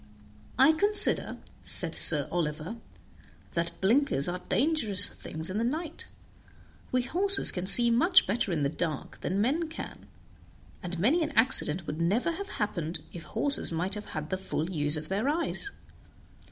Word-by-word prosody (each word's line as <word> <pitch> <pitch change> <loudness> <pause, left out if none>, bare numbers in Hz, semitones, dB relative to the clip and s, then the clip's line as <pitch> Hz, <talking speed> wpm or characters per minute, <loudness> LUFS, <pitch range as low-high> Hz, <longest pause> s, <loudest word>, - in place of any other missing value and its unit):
"I 265 +5 +6
consider," 410 +6 +3 0.3
said - - +2
Sir 145 -3 +6
Oliver, 165 +4 -4 0.8
"that 170 0 -3
blinkers 215 - +1
are 180 +1 -3
dangerous 250 - +2
things 160 +3 -4
in 205 - -3
the - - -1
night; 315 +6 -4 0.8
we 255 -1 +1
horses 390 +9 +2
can 180 0 -5
see 235 +4 +5
much 345 +11 +4
better 205 -1 -1
in 155 -4 -1
the - - +2
dark 155 -1 -5
than 190 +2 -3
men 305 +9 -1
can, 325 - -9 0.7
and 180 -2 -6
many 260 - +2
an 310 - -1
accident 180 - +2
would 155 +1 -5
never 210 - 0
have 395 +4 -7
happened 175 -6 -4
if 170 - -8
horses 170 - -1
might 175 +4 -3
have 210 0 -3
had 155 0 -7
the 185 - -2
full 180 -2 -4
use 150 -2 +2
of 155 0 -6
their 205 +8 -1
eyes. 340 +6 +2
200 Hz, 160 wpm, -28 LUFS, -, 0.8 s, I